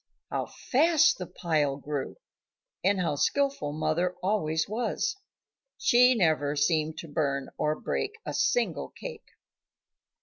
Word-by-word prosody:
How - - -2
fast 310 - +3
the 180 - -5
pile 150 -6 0
grew! 145 -1 -4 0.7
and 195 0 +3
how 160 -5 0
skilful 275 - +1
mother 170 +4 0
always 160 -6 0
was. 240 - -1 0.6
She 250 +1 +5
never 155 -7 +2
seemed 155 +1 +1
to 165 - -7
burn 140 -3 -1
or 150 0 -1
break 420 - -2
a - - -4
single - - 0
cake. 475 -3 -9
165 Hz, 125 wpm, -28 LUFS, 150-240 Hz, 0.7 s, She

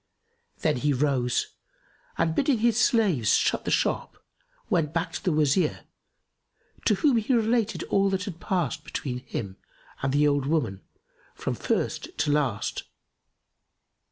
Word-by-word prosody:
Then 155 -5 +2
he 145 +3 +1
rose 130 -3 0 0.6
and 165 -1 +1
bidding 270 - +2
his 230 0 +2
slaves 200 - +3
shut - - +1
the - - -1
shop, - - 0 0.5
went 165 -3 0
back 170 +1 -1
to - - -5
the 180 - +1
Wazir, 150 +2 +2 1.0
to - - +4
whom 285 -7 +3
he 230 +3 +1
related 225 -1 +1
all 195 0 +2
that 190 -1 -1
had 180 -4 -7
passed 165 -5 -1
between 125 -3 -4
him 100 -6 -6 0.4
and 135 - 0
the 145 +2 +3
old 140 -2 +1
woman, 120 -12 0 0.5
from - - -3
first - - -2
to 145 0 +1
last. 135 -8 -1
155 Hz, 140 wpm, -26 LUFS, 135-195 Hz, 1.0 s, to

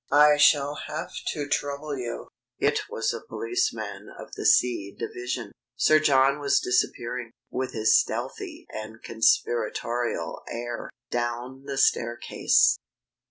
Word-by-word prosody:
I 150 +1 +7
shall 145 -1 +5
have 155 +3 -5 0.2
to 145 -3 -2
trouble 145 +1 -2
you 120 -3 -5
" - - -66
It - - 0
was - - -1
a - - -5
policeman 110 -3 -3
of - - -10
the - - -1
C 100 -5 +3
division. 120 -2 -4 0.2
Sir 155 +5 +5
John 140 -1 +4
was 140 -1 +3
disappearing, 125 -1 -1 0.2
with 130 0 -3
his 110 0 +4
stealthy - - -1
and 110 +1 -8
conspiratorial 115 -4 0
air, 120 0 -5 0.2
down 120 +3 -3
the 140 -1 -4
staircase. 120 -2 +3
120 Hz, 125 wpm, -26 LUFS, 115-140 Hz, 0.2 s, I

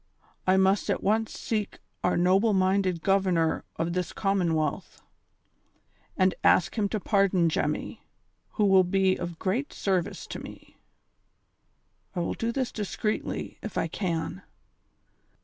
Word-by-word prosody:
I 185 +1 +5
must 190 +1 +2
at - - 0
once 220 +2 +1
seek 215 -3 -2 0.3
our 180 - +2
noble 190 +5 +3
minded 185 -2 +1
Governor 185 -4 +2
of 170 +1 -2
this 180 -1 -2
Commonwealth, 170 -7 -1 1.2
and 185 0 +3
ask 175 - +4
him 210 -3 0
to 215 - -2
pardon 195 -4 +2
Jemmy, 150 -1 -2 0.5
who 210 - +2
will 190 -1 +6
be 190 +1 +2
of 170 -1 -5
great 225 - -1
service 185 -4 -1
to - - -7
me. - - -12 1.4
I - - -1
will 170 - -1
do 230 +1 -2
this 260 0 -2
secretly, 210 +1 -3
if 215 - -6
I - - +1
can. 165 - -3
190 Hz, 130 wpm, -27 LUFS, 175-205 Hz, 1.4 s, will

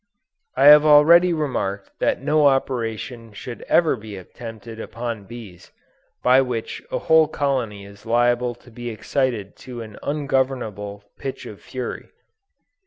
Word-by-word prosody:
I - - +4
have 150 +1 +9
already 160 +4 +6
remarked 120 -11 -2
that - - 0
no 150 -1 +4
operation 120 -3 -2
should 120 +3 -8
ever 165 -5 +4
be 110 -3 -9
attempted 110 +3 -10
upon 115 -2 -5
bees, 105 -6 -11 0.5
by 130 +1 +6
which 125 -4 -4
a - - 0
whole 160 -1 +4
colony 130 -9 -2
is 100 +1 -15
liable 120 +1 +1
to 120 +1 -19
be 120 +1 -6
excited 115 -2 -2
to 120 -2 -8
an 110 -2 -12
ungovernable 130 -8 -2 0.2
pitch 135 -1 -6
of 105 - -10
fury. 130 -1 -6
120 Hz, 135 wpm, -22 LUFS, 110-135 Hz, 0.5 s, have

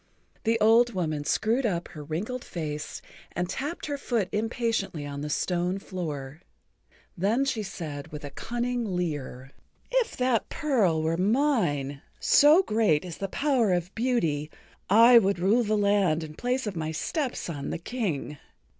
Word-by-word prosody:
The 225 +1 +2
old 230 +1 +5
woman 155 -5 -2
screwed 230 - +1
up 175 -7 -1
her 150 - -9
wrinkled 200 - -4
face 155 -2 -5 0.3
and 175 0 -1
tapped 290 - -4
her 285 -2 -3
foot 225 -8 -1
impatiently 220 -7 -1
on 140 0 -5
the 150 - -4
stone 180 +4 0
floor. 155 -7 -6 0.7
Then 215 +9 +1
she 235 -5 -1
said 160 -8 -6
with 150 -1 -9
a 145 - -6
cunning 240 - -2
leer: 145 -6 -4 0.4
"If - - +1
that 250 -3 +1
pearl 220 - +1
were 165 +1 0
mine—so 220 - +3
great 210 - +2
is 175 -3 -8
the 195 - -2
power 255 -2 +1
of 175 +1 -2
beauty—I 225 - +3
would 200 -3 +1
rule 200 +7 +3
the[Pg - - -1
57] 210 -1 +2
land 195 -6 +2
in 155 -1 -8
place 250 +8 -1
of 205 -3 -4
my 160 -1 -2
step 265 - -2
son 145 -5 -5
the - - -2
King. 165 - -3
195 Hz, 155 wpm, -27 LUFS, 155-240 Hz, 0.7 s, old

